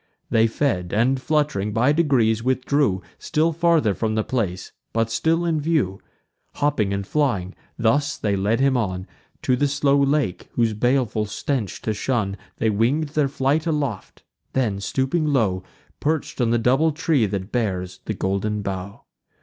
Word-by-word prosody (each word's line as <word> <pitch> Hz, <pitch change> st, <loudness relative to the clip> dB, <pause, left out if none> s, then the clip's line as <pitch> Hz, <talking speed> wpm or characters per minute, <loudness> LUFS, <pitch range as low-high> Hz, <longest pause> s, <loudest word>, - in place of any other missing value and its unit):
They 115 Hz, -1 st, +4 dB
fed, 110 Hz, -8 st, -1 dB
and, 130 Hz, +5 st, +2 dB
flutt'ring, 145 Hz, -10 st, 0 dB
by 120 Hz, +6 st, +3 dB
degrees 130 Hz, -9 st, +2 dB
withdrew 130 Hz, -5 st, +1 dB, 0.2 s
Still 165 Hz, +1 st, +1 dB
farther 165 Hz, -9 st, +3 dB
from 110 Hz, +2 st, -1 dB
the 110 Hz, -, +1 dB
place, 100 Hz, -8 st, -2 dB, 0.2 s
but 115 Hz, 0 st, 0 dB
still 160 Hz, +9 st, +1 dB
in 160 Hz, -3 st, 0 dB
view: 145 Hz, -, 0 dB, 0.5 s
Hopping 140 Hz, -9 st, +1 dB
and 100 Hz, 0 st, -2 dB
flying, 105 Hz, -10 st, 0 dB, 0.2 s
thus 120 Hz, +5 st, +1 dB
they 105 Hz, -2 st, 0 dB
led 105 Hz, +4 st, +1 dB
him 135 Hz, 0 st, +3 dB
on 95 Hz, -6 st, -1 dB, 0.4 s
To 130 Hz, -, +3 dB
the 145 Hz, +3 st, +2 dB
slow 140 Hz, 0 st, +2 dB
lake, 140 Hz, -8 st, 0 dB
whose 115 Hz, -2 st, +1 dB
baleful 115 Hz, -1 st, +1 dB
stench 110 Hz, 0 st, -3 dB
to 110 Hz, -, 0 dB
shun 105 Hz, -3 st, -1 dB, 0.2 s
They 110 Hz, -, +1 dB
wing'd 130 Hz, +9 st, +1 dB
their 150 Hz, -1 st, +1 dB
flight 140 Hz, +4 st, 0 dB
aloft; 140 Hz, -, -3 dB, 0.3 s
then, 110 Hz, -7 st, 0 dB
stooping 135 Hz, -, 0 dB
low, 110 Hz, -10 st, +1 dB, 0.4 s
Perch'd 155 Hz, -3 st, -1 dB
on 120 Hz, -, +2 dB
the 120 Hz, -, +3 dB
double 130 Hz, +7 st, +3 dB
tree 150 Hz, -7 st, +1 dB
that 95 Hz, 0 st, -4 dB
bears 95 Hz, -6 st, -2 dB
the 110 Hz, -, -2 dB
golden 100 Hz, +2 st, -1 dB
bough. 95 Hz, 0 st, -5 dB
120 Hz, 160 wpm, -23 LUFS, 105-145 Hz, 0.5 s, They